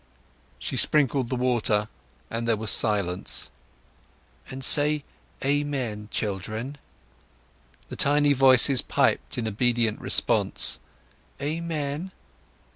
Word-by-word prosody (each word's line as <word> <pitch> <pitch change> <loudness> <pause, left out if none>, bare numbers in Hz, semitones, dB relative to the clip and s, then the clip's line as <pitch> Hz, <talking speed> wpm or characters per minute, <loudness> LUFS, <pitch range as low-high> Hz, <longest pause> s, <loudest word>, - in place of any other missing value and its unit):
She - - -5
sprinkled 140 -4 +2
the 130 - -2
water, 120 -4 0 0.4
and 115 0 -3
there 115 -2 +1
was 110 -1 -1
silence. 100 -5 +1 1.1
"Say 145 +2 +3 0.4
'Amen,' 135 -7 -2
children." 110 +8 -4 1.1
The - - -7
tiny 145 0 +2
voices 130 -1 +5
piped - - 0
in 115 -2 -3
obedient 115 0 0
response, - - +3 0.6
"Amen!" 155 +2 -4
125 Hz, 90 wpm, -25 LUFS, 110-145 Hz, 1.1 s, voices